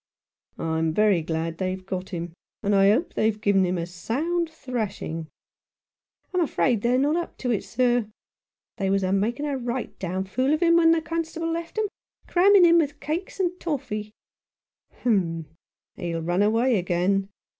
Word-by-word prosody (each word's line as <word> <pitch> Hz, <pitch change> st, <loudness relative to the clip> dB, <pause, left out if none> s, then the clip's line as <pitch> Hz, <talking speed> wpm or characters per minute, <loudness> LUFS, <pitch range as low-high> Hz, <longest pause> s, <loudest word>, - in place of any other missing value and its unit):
"I'm 160 Hz, 0 st, -1 dB
very 210 Hz, -5 st, +4 dB
glad 165 Hz, +1 st, -3 dB
they've 185 Hz, 0 st, -3 dB
got 185 Hz, 0 st, -4 dB
him, 175 Hz, -2 st, -5 dB, 0.3 s
and 205 Hz, -, +1 dB
I 195 Hz, 0 st, +5 dB
hope 275 Hz, -, +1 dB
they've 215 Hz, -1 st, +1 dB
given 200 Hz, -2 st, +3 dB
him 180 Hz, 0 st, -1 dB
a 170 Hz, -, -2 dB
sound 300 Hz, -, -2 dB
thrashing! 220 Hz, -, -4 dB, 0.4 s
" -, -, -69 dB
" -, -, -48 dB
I'm 365 Hz, -, +2 dB
afraid 255 Hz, -8 st, +1 dB
they're 245 Hz, +2 st, +2 dB
not 290 Hz, +4 st, +2 dB
up 345 Hz, -, -4 dB
to 250 Hz, -, -2 dB
it, 215 Hz, -, 0 dB
sir. 245 Hz, -2 st, +1 dB, 0.7 s
They 195 Hz, -2 st, 0 dB
was 195 Hz, 0 st, +2 dB
a 185 Hz, 0 st, +1 dB
making 230 Hz, +8 st, 0 dB
a 285 Hz, -2 st, -1 dB
right 245 Hz, 0 st, -4 dB
down 185 Hz, +1 st, -2 dB
fool 255 Hz, +10 st, +1 dB
of 320 Hz, -, -1 dB
him 335 Hz, 0 st, +5 dB
when 330 Hz, -1 st, +5 dB
the 330 Hz, -1 st, +3 dB
constable 330 Hz, 0 st, -3 dB
left 335 Hz, +4 st, -5 dB
'em, 435 Hz, -, +2 dB, 0.4 s
cramming 375 Hz, +1 st, +6 dB
him 340 Hz, 0 st, +6 dB
with 295 Hz, -2 st, -1 dB
cakes 315 Hz, +8 st, -4 dB
and 360 Hz, -2 st, +2 dB
toffy." 245 Hz, -10 st, -3 dB, 0.5 s
" -, -, -58 dB
Humph! 175 Hz, -8 st, +1 dB, 0.5 s
he'll 170 Hz, -3 st, -3 dB
run 175 Hz, +3 st, +1 dB
away 225 Hz, +2 st, +3 dB
again. 185 Hz, +2 st, 0 dB
220 Hz, 175 wpm, -25 LUFS, 185-310 Hz, 0.7 s, cramming